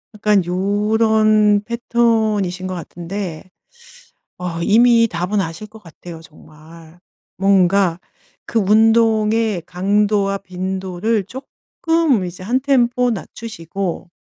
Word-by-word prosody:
약간 210 -2 +2
요런 210 +2 +2
패턴이신 220 -6 0
것 185 - -4
같은데. 175 +1 -7 0.9
어 175 -2 -4
이미 230 +4 +4
답은 180 +2 -2
아실 165 +3 -6
것 215 +1 -15
같아요 170 -1 -12
정말. 160 +1 -17 0.4
뭔가 190 -2 +2 0.5
그 230 - -1
운동의 220 -1 +2
강도와 200 +1 0
빈도를 190 +2 -3
쪼끔 275 - -2
이제 180 +1 -8
한 240 +7 0
템포 250 -2 +2
낮추시고 195 -5 -6
200 Hz, 200 characters per minute, -18 LUFS, 180-220 Hz, 0.9 s, 이미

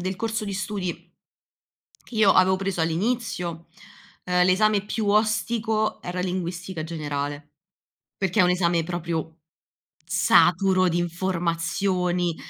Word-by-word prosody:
del 185 +1 -3
corso 225 +1 -2
di 200 - -4
studi, 190 -1 -3 1.1
che - - -14
io 210 -3 +5
avevo 185 0 +4
preso 195 -2 -2
all'inizio, 170 -1 -2 0.6
uhm, 180 0 +2
l'esame 205 +2 +3
più 215 0 -3
ostico 215 +1 +1
era 180 +1 -4
linguistica 180 -1 -4
generale, 145 -2 -5 0.6
perché 195 +1 +1
è - - +7
un 180 - +4
esame 175 -2 +2
proprio 165 -2 -4 0.7
saturo 185 +1 +4
di 170 0 0
informazioni, 175 0 -1
180 Hz, 115 wpm, -24 LUFS, 170-200 Hz, 1.1 s, è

